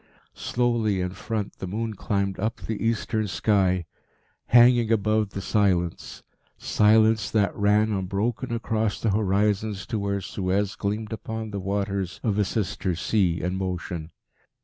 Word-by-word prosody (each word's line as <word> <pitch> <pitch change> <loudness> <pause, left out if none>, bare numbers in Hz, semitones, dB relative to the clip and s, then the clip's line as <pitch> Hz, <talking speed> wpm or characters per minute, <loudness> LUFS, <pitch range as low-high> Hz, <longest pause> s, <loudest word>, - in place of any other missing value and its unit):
Slowly, 120 -5 0
in 90 0 -2
front, 105 +2 -4
the 95 - -4
moon 110 +4 -3
climbed 100 -1 -2
up 110 +4 -1
the 110 0 -4
eastern 110 -1 0
sky, 95 -3 +1 0.6
hanging 120 -1 +6
above 110 -1 +2
the 100 0 -6
silence 95 -4 0 0.3
silence 110 0 +3
that 105 -3 +1
ran 105 +2 +3
unbroken 105 +6 -2
across 110 -2 -1
the 110 - +1
horizons 105 0 0
to 115 -3 -3
where 100 0 -1
Suez 95 +1 -1
gleamed 105 +2 -3
upon 110 0 -5
the 100 - -3
waters 100 -1 -2
of 105 -3 +1
a 105 - +3
sister 95 -3 -2
sea 85 0 +1
in 90 +1 -1
motion. 90 -3 -4
105 Hz, 140 wpm, -25 LUFS, 95-110 Hz, 0.6 s, hanging